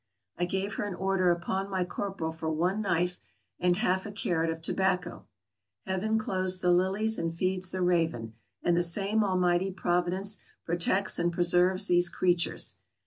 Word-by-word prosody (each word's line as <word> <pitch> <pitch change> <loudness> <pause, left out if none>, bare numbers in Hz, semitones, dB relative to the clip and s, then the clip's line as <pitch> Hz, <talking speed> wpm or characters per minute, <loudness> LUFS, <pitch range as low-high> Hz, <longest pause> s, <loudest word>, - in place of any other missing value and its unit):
I 175 - -1
gave 190 +3 -3
her - - -2
an 200 -3 -4
order 190 -1 +1
upon 190 +3 -1
my 190 -2 -1
corporal 190 -3 -4
for 160 0 -5
one 180 +6 0
knife 180 -2 -1 0.4
and 180 0 +2
half 190 -3 +1
a - - -6
carrot 170 -5 -1
of 165 0 -3
tobacco. 185 +2 -1 0.6
Heaven 190 +4 -1
clothes 185 -3 -1
the 180 -1 +2
lilies 195 +5 +1
and 165 0 -1
feeds 185 +2 -1
the 185 0 -2
raven, 160 -11 0 0.3
and 175 - +2
the 175 - +2
same 200 +5 +3
Almighty 180 -1 +1
Providence 185 +2 -1 0.3
protects 175 +4 +2
and 175 0 +1
preserves 180 +2 +3
these 175 -2 +4
creatures. 175 -2 0
180 Hz, 160 wpm, -28 LUFS, 175-195 Hz, 0.6 s, these